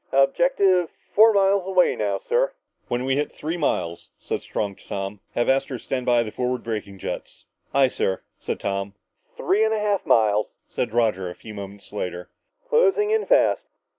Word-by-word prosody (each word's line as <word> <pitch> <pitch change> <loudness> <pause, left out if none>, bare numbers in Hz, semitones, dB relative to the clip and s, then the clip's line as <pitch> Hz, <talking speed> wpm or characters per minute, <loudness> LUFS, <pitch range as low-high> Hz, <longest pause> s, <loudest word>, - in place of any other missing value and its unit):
"Objective 180 - +3 0.2
four 220 +2 +7
miles 195 -1 +3
away 185 -2 +3
now, 100 -2 -1
sir." - - +2 0.3
"When 120 +1 -1
we 135 +1 +1
hit 145 - -1
three 160 +3 -4
miles," 85 - -2
said - - -4
Strong 100 -2 -3
to - - -19
Tom, 100 +1 -4 0.2
"have 120 - +1
Astro 135 -1 +1
stand 125 +2 -4
by 120 -1 +4
the 110 - -6
forward 125 +1 -2
braking 105 -4 -4
jets." - - -6 0.3
"Aye, 135 -1 +4
sir," 95 -6 -1 0.2
said - - -4
Tom. 100 0 -3 0.4
"Three 205 +3 +2
and 220 0 +2
a - - -1
half 205 -2 0
miles," 105 -1 +3 0.2
said 120 - -2
Roger 110 -6 +1
a 90 - -8
few 110 - -11
moments 100 0 -9
later. 90 -3 -5 0.4
"Closing 425 -3 +3
in 440 0 +1
fast. - - +3
125 Hz, 175 wpm, -24 LUFS, -, 0.4 s, four